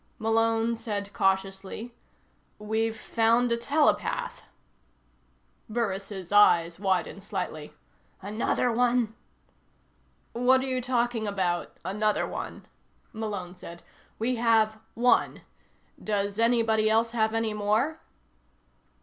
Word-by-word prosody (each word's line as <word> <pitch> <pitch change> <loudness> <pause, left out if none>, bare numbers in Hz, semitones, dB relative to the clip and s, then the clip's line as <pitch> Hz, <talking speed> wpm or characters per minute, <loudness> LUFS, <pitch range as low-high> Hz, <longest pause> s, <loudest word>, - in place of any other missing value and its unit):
Malone 225 +1 +1
said 205 -3 -5
cautiously: 195 +4 -1 0.6
"We've 220 +1 -2
found 230 +2 +2
a - - +4
telepath." 300 - 0 1.3
Burris' 195 -4 -3
eyes 175 -5 +5
widened 195 0 -1
slightly. 155 -6 -5 0.4
"Another 215 +4 0
one?" 240 -1 +1 1.2
"What 250 +2 +4
are - - -3
you 255 -1 -1
talking 240 -3 0
about, 185 -4 -2
another 210 +2 0
one?" - - -7 0.5
Malone 205 -5 -5
said. 170 -2 -11 0.3
"We 240 +2 -1
have 220 -2 +3 0.2
one. 245 +2 +2 0.6
Does 205 0 -1
anybody 225 -2 +3
else 225 +1 +2
have 220 -1 0
any 225 -1 0
more?" 215 +10 0
220 Hz, 100 wpm, -27 LUFS, 200-235 Hz, 1.3 s, eyes